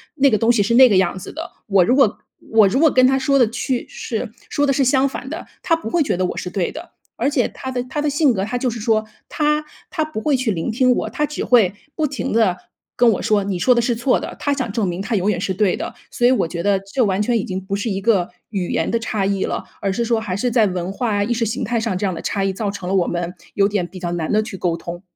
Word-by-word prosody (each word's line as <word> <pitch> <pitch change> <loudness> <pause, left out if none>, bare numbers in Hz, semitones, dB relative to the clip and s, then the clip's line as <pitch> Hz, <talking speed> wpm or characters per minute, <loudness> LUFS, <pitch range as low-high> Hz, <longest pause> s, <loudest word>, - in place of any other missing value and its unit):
那 275 +1 +4
个 215 - +2
东 225 +3 +3
西 235 -3 +3
是 225 +4 +1
那 260 +1 +9
个 205 - +3
样 185 0 +1
子 185 - -8
的。 320 +2 -6 0.2
我 195 -3 +4
如 250 - +3
果 235 -6 +3 0.3
我 220 -2 +6
如 195 - 0
果 320 -3 +5
跟 255 0 +5
他 265 +1 +3
说 275 +1 +2
的 240 -4 +4
去 245 +2 -2
是 485 0 -4 0.2
说 290 -1 +1
的 275 - +3
是 270 - +2
相 265 +1 +3
反 265 -1 -6
的， 320 - -6 0.2
他 330 - +2
不 325 - -6
会 330 +5 +2
觉 185 - -1
得 185 - +1
我 - - -3
是 180 - -4
对 180 -1 -2
的。 340 +3 -9 0.2
而 280 - 0
且 260 -5 +1
他 260 - -7
的 250 -1 -2
他 280 +4 -3
的 300 - +1
性 285 -2 +3
格， 190 -3 -1
他 235 +4 -2
就 250 +1 0
是 230 -2 -5
说 220 -1 +1 0.2
他 300 0 +1 0.3
他 320 -4 -1
不 310 -7 -5
会 290 +5 +1
去 255 -3 0
聆 170 +3 -2
听 250 +2 +3
我， - - -2
他 300 - -1
只 300 - -4
会 220 -8 +4 0.2
不 310 - 0
停 275 -1 -3
地 215 -6 +3 0.4
跟 240 -1 +5
我 - - -3
说： 210 -1 +2
“你 195 -2 -2
说 250 +8 +4
的 235 - +2
是 240 0 0
错 240 +3 +2
的”。 - - -7
他 285 - 0
想 255 -5 -2
证 220 -2 0
明 175 +1 -3
他 220 +3 -2
永 200 +2 +1
远 180 - -2
是 190 - -1
对 200 -2 +2
的。 - - -5 0.2
所 240 - +2
以 250 - +5
我 210 -9 +2
觉 170 +1 -4
得 200 +1 +2
这 200 +6 -1
完 190 -1 0
全 235 +2 +1
已 - - -2
经 185 0 -3
不 195 - -5
是 205 +3 -2
一 195 -2 -1
个 195 -5 +2 0.2
语 190 -4 -3
言 - - 0
的 230 - +1
差 215 -3 -2
异 195 -1 0
了。 - - -3 0.2
而 195 - 0
是 235 - -1
说， 230 -1 +1
还 205 -5 -3
是 245 +4 0
在 225 -3 +4
文 180 0 -3
化、 205 -1 0
意 230 +4 0
识 230 0 0
形 225 +4 -2
态 235 -2 0
上 220 -5 -1
这 200 - -1
样 185 - 0
的 165 - -6
差 195 -1 -1
异， 195 - +1
造 205 +1 -2
成 200 -2 -6
了 195 - -1
我 180 -3 +2
们 175 0 -3 0.2
有 200 0 +4
点 200 -4 -1
比 185 - -12
较 175 -1 -3
难 170 -2 -2
地 215 +1 +3
去 215 -3 -7
沟 175 -2 0
通。 170 +1 -7
220 Hz, 320 characters per minute, -20 LUFS, 195-255 Hz, 0.4 s, 那